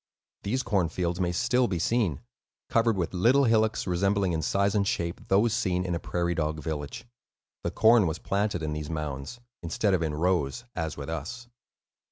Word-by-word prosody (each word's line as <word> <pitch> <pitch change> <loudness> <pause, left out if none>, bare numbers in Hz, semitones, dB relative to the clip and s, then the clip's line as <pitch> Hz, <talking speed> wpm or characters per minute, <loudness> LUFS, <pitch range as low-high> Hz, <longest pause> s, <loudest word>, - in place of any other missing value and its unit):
These 130 +6 -1
corn 95 -6 +1
fields 85 +1 -2
may 90 -2 +1
still 125 +8 +2
be 90 - -2
seen, 95 - 0 0.5
covered 115 -2 +2
with 90 -1 -2
little 120 +10 +4
hillocks 110 -2 +2
resembling 95 +1 +1
in 80 - -1
size 100 +5 +1
and 100 -2 +1
shape 85 -1 -2
those 105 +4 +3
seen 95 -6 0
in 90 - -1
a 85 - -1
prairie 85 0 -1
dog 80 -1 -1
village; 75 - -5 0.6
the - - -1
corn 110 -3 +5
was 80 +1 -2
planted 100 -3 -1
in 75 -1 -2
these 75 -1 -5
mounds, 75 - -4 0.2
instead 95 +4 0
of 90 - +2
in 80 -2 -1
rows, 85 - 0
as 80 -3 -3
with 70 - -6
us. 80 +11 -5
90 Hz, 185 wpm, -27 LUFS, 80-110 Hz, 0.6 s, corn